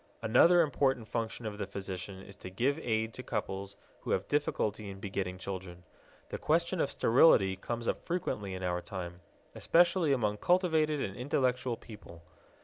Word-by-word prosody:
Another 170 +10 +6
important 135 -5 0
function 115 0 -3
of 105 -1 -5
the 100 - -3
physician 95 -1 -6
is 100 - -12
to 90 - -8
give 130 +11 0
aid 110 -4 -1
to - - -7
couples 100 -4 -4 0.2
who - - -8
have 95 - 0
difficulty 110 -8 -1
in 95 0 -8
begetting 95 -2 -3
children. 90 -2 -7 0.5
The - - -5
question 170 +2 +1
of 140 - +1
sterility 115 -8 +5
comes 115 +4 -5
up - - -1
frequently 105 - -3
in 95 - -6
our 90 -1 -1
time, 90 -2 -7 0.3
especially 170 -2 +3
among 105 -6 +1
cultivated 160 - +2
and 95 -5 -3
intellectual 125 -1 0
people. 85 -6 -13
110 Hz, 160 wpm, -31 LUFS, 95-140 Hz, 0.5 s, Another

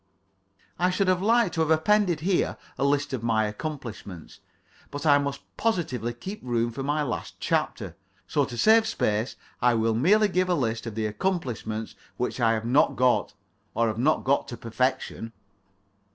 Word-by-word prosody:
I 180 +1 +3
should 185 +1 0
have 185 -1 +2
liked 230 -2 +3
to 165 - 0
have 160 - +1
appended 175 +1 +3
here 180 +2 0 0.2
a - - -2
list 145 0 +1
of 130 - -2
my 110 -2 +1
accomplishments, 105 - -7 0.5
but 145 +1 -6
I 145 -2 +6
must 140 -1 -3 0.2
positively 150 - -1
keep 185 - -7
room 120 -1 -1
for 125 - -6
my 145 +2 0
last 135 - -4
chapter. - - -1 0.3
So - - +1
to 120 - -8
save 220 - +5
space 110 - -1 0.3
I 125 -1 +4
will 115 0 +1
merely 200 - +4
give 185 -1 0
a 180 - +3
list 115 -5 -2
of 110 - -6
the 110 -1 -1
accomplishments 110 - -3 0.2
which 125 +1 -2
I 115 -2 +3
have 110 0 -2
not 125 +5 +3
got, 125 -1 +2 0.4
or 115 -1 +2
have 110 +1 -4
not 150 +6 +2
got 140 +1 +1
to 120 - -7
perfection. 115 -1 -2
135 Hz, 175 wpm, -26 LUFS, 115-175 Hz, 0.5 s, I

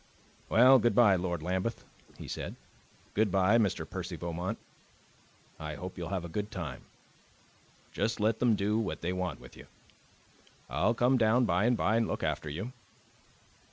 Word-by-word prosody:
"Well, 130 +3 +7
goodbye, 120 -3 +5
Lord 85 -3 -2
Lambeth," 95 +6 -2 0.3
he - - -9
said; - - -5 0.6
"goodbye, 100 +1 +3
Mr. 100 -5 0
Percy - - -5
Beaumont. 85 +1 -4 1.0
I 75 -1 -5
hope 90 +5 -7
you'll 85 -2 -5
have 95 -3 -2
a - - -4
good 105 +5 -4
time. 80 -10 -6 1.1
Just 110 +1 -1
let 110 +1 +1
them 120 -3 +3
do 105 +2 0
what 80 -8 -3
they 85 +2 -1
want 90 0 -3
with - - -14
you. - - -13 1.0
I'll 115 +3 +2
come 125 +2 +3
down 115 +2 +4
by 90 +1 +2
and 120 0 +3
by 110 - +2
and 115 - +1
look - - -3
after 75 - -2
you." 95 - -5
100 Hz, 155 wpm, -30 LUFS, 90-115 Hz, 1.1 s, Well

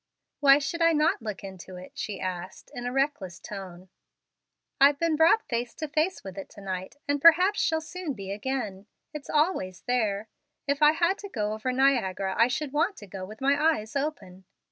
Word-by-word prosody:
"Why 275 -1 +7
should 295 +4 -3
I 330 0 +5
not 300 -4 +2
look 215 -3 -6
into 190 -1 -9
it?" 180 +1 -10
she 210 - -5
asked, 185 0 -6
in 245 0 -5
a - - -2
reckless 260 - -1
tone. 185 -2 -9 0.9
"I've 280 +1 +6
been 330 0 +1
brought 330 +8 +5
face 240 0 -3
to 315 - -4
face 315 +6 0
with 190 0 -7
it 195 - -8
to 205 - -13
night, 190 +1 -5
and 285 0 0
perhaps 360 +6 +6
shall 320 0 +1
soon 335 -1 -5
be 195 -4 -7
again. 210 -3 -4 0.3
It's 300 -2 -8
always 295 - 0
there. 220 -4 -1 0.4
If 280 +1 -1
I 300 0 +7
had 345 +4 +1
to 405 - -8
go 210 - -2
over 220 +4 -2
Niagara, 230 -8 +1
I 230 - +5
should 280 +2 -3
want 335 +7 +1
to 210 - -10
go 190 -1 -7
with 215 +5 -12
my 275 +1 +3 0.2
eyes 215 +3 -9
open." 275 -11 -4
250 Hz, 195 wpm, -27 LUFS, 195-300 Hz, 0.9 s, Why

